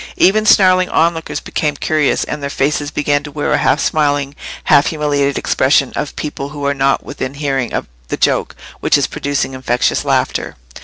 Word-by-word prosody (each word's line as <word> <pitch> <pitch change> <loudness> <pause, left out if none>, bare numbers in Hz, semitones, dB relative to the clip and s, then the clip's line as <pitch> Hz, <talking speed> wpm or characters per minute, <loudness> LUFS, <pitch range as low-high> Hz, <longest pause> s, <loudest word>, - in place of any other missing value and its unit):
Even 215 +3 +3
snarling 185 -2 +5
onlookers 165 0 0
became 150 -2 -2
curious, 150 0 +1
and 150 - -5
their 140 - -3
faces 145 +1 -1
began 145 -1 0
to 145 - -8
wear 145 0 -2
the - - +3
half - - +2
smiling, 145 -2 0 0.3
half 140 - +4
humiliated 145 -3 0
expression 135 0 +2
of 150 - -4
people 145 -2 -5
who 145 -1 -6
are 140 - +2
not 135 0 +1
within 140 -1 -5
hearing 135 -4 -2
of - - -2 0.2
the - - -3
joke - - 0 0.2
which - - +3
is - - +1
producing 140 -2 -2
infectious 125 -2 0
laughter. - - -1
145 Hz, 175 wpm, -16 LUFS, 140-150 Hz, 0.3 s, snarling